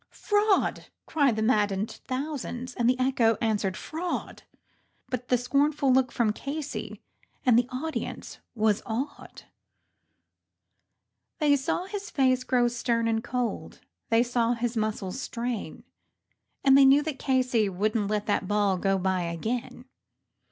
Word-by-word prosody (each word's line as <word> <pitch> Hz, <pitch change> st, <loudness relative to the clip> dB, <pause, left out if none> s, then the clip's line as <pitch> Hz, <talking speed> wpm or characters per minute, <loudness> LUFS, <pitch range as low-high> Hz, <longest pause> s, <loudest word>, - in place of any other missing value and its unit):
"Fraud!" 415 Hz, -1 st, +1 dB, 0.3 s
yelled 280 Hz, -7 st, +4 dB
the 220 Hz, -, -1 dB
maddened 210 Hz, -3 st, +1 dB
thousands, 255 Hz, -2 st, -4 dB
and 240 Hz, -1 st, +1 dB
the 250 Hz, -, +2 dB
echo 245 Hz, -4 st, +2 dB
answered 205 Hz, -4 st, 0 dB
"Fraud," 340 Hz, +3 st, -4 dB, 0.7 s
But 250 Hz, -1 st, -4 dB
one 250 Hz, -, +4 dB
scornful 280 Hz, +2 st, +2 dB
look 255 Hz, -1 st, +3 dB
from 220 Hz, -3 st, +1 dB
Casey 285 Hz, +5 st, -6 dB, 0.4 s
and 250 Hz, -3 st, +5 dB
the 245 Hz, +1 st, +3 dB
audience 305 Hz, +5 st, -5 dB, 0.2 s
was 215 Hz, -2 st, +2 dB
awed; 260 Hz, +6 st, -5 dB, 1.9 s
They 295 Hz, -2 st, +4 dB
saw 280 Hz, +6 st, -1 dB
his 400 Hz, +1 st, -6 dB
face 255 Hz, -2 st, +2 dB
grow 245 Hz, -1 st, +2 dB
stern 235 Hz, -1 st, 0 dB
and 225 Hz, 0 st, 0 dB
cold; 245 Hz, -1 st, -3 dB, 0.3 s
they 230 Hz, +1 st, +4 dB
saw 240 Hz, -1 st, +1 dB
his 240 Hz, 0 st, -2 dB
muscles 215 Hz, 0 st, -2 dB
strain, 240 Hz, -2 st, -4 dB, 0.8 s
And 270 Hz, -1 st, +6 dB
they 275 Hz, -, +8 dB
knew 275 Hz, +2 st, +6 dB
that 300 Hz, -3 st, -4 dB
Casey 255 Hz, -6 st, +1 dB
would 205 Hz, +4 st, -1 dB
not 210 Hz, -3 st, 0 dB
let 210 Hz, 0 st, -1 dB
that 205 Hz, -2 st, 0 dB
ball 205 Hz, -2 st, +1 dB
go 195 Hz, 0 st, +1 dB
by 190 Hz, -1 st, 0 dB
again. 225 Hz, +9 st, -4 dB
245 Hz, 135 wpm, -27 LUFS, 220-270 Hz, 1.9 s, they